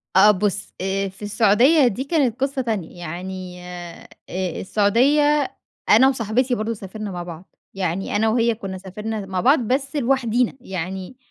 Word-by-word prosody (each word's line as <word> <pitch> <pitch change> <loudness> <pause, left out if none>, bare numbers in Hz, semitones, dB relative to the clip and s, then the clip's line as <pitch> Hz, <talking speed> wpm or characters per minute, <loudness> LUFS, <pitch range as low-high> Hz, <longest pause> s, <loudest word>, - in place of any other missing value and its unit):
أ - - +7
أ - - +9
بُص، 205 +1 -2
آآ 195 +1 -1
في 190 +2 -19
السعودية 230 +8 +4
دي 240 +3 -2
كانت 275 -5 0
قصّة 270 0 0
تانية، 210 -8 -4
يعني 180 +2 -6
آآ 175 -1 -9 0.5
السعودية، 275 +9 +2 0.3
أنا 245 +5 +7
وصاحبتي 245 0 +1
برضو 225 0 -2
سافرنا 205 0 -7
مع 175 -1 -5
بعض. 175 +1 -11 0.2
يعني 190 0 -2
أنا 220 +2 +3
وهي 230 0 +2
كنّا 195 -4 -6
سافرنا 210 +3 -5
مع 190 -1 -2
بعض 275 - +5
بس 265 +5 -1
لوحدِينا، 250 -3 +1
يعني 190 +3 -5
210 Hz, 155 wpm, -22 LUFS, 190-250 Hz, 0.5 s, أ